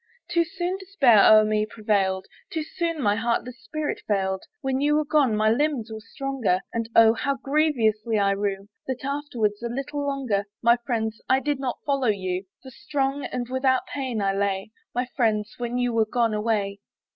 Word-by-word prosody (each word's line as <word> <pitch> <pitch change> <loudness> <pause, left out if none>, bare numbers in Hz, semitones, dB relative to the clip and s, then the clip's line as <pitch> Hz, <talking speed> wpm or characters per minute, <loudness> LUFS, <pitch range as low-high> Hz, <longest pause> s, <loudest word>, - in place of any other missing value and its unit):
Too 340 -1 +3
soon 350 +3 -3
despair 280 - +5
o'er 215 0 +8
me 215 0 +1
prevailed; 200 -4 0 0.2
Too 320 - -2
soon 335 0 -3
my 205 -1 +3
heartless 235 +3 -2
spirit 310 -1 -3
failed; 190 -2 0 0.2
When 265 0 -1
you 295 +1 +3
were 305 0 +2
gone 285 -7 +3
my 215 0 +3
limbs 260 -3 0
were 220 - -6
stronger, 235 -4 -1
And 230 -1 -2
Oh 225 -1 +7
how 275 +4 -1
grievously 235 -7 +1
I 200 -1 +3
rue, 195 0 -2 0.2
That, 260 0 -4
afterwards, 250 -8 -1
a 235 - -3
little 275 +4 -3
longer, 265 -8 -1 0.2
My 235 +1 +5
friends, 220 -3 -2
I 260 - +5
did 285 0 -1
not 260 -3 -2
follow 275 -3 +1
you! 185 -2 -1 0.2
For 260 - -10
strong 275 +1 -2
and 245 -1 -4
without 260 0 +1
pain 260 -6 -3
I 195 0 +1
lay, 195 +1 -1 0.2
My 245 +1 +1
friends, 215 -4 +1
when 240 0 -2
you 245 -1 0
were 225 -1 +2
gone 230 -1 +1
away. 210 -2 -1
235 Hz, 180 wpm, -25 LUFS, 215-275 Hz, 0.2 s, o'er